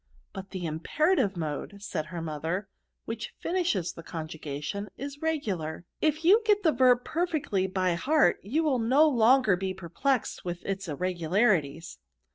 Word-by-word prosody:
" - - -38
But 195 -1 -7
the 185 -3 -5
imperative 205 - +1
mood/* 160 +5 -4
said 155 -6 -3
her 170 -1 -5
mo 155 -2 -4
ther, 165 +5 -1
^^ - - -26 0.4
which 225 0 -5
finishes 340 - 0
the - - -9
conjugation, 160 +4 -5
is 280 +2 -7
regular* 195 - -2 0.2
If 310 +1 +1
you 410 +6 +7
get 420 -2 +3
the 320 - +5
verb 250 -2 +4
perfectly 300 - 0
by 185 -1 0
heart, 295 - +3
you 280 - 0
will 280 -5 +2
no 265 +7 +5
longer 245 -5 +4
be 190 +1 -3
perplexed 205 - -1
with 175 -1 -5
its 195 -1 -3
irregularities." 170 - 0
200 Hz, 160 wpm, -28 LUFS, 170-280 Hz, 0.4 s, you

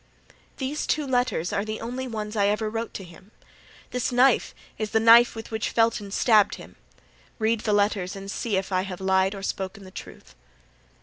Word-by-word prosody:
"These 280 +3 -3
two 300 -1 0
letters 245 -10 0
are 200 - 0
the 215 0 -5
only 250 +3 -4
ones 215 -2 -5
I 200 -1 +3
ever 215 +1 0
wrote 225 +1 -3
to 195 - -5
him. 180 +3 -15 0.6
This 250 0 -1
knife 250 +1 +3 0.2
is 215 -1 -2
the 220 - +2
knife 230 +2 +7
with 225 0 -8
which 220 -1 -2
Felton 225 -3 +1
stabbed 210 0 +3
him. - - -13 0.6
Read 220 0 +1
the 215 - -1
letters 200 -2 +1
and 195 0 -7
see 215 -3 -1
if 195 +1 -3
I 185 -1 +2
have 185 -2 -6
lied 190 +1 +2
or 195 - -8
spoken 195 0 -4
the 185 - -12
truth." - - -11
215 Hz, 190 wpm, -25 LUFS, 195-230 Hz, 0.6 s, knife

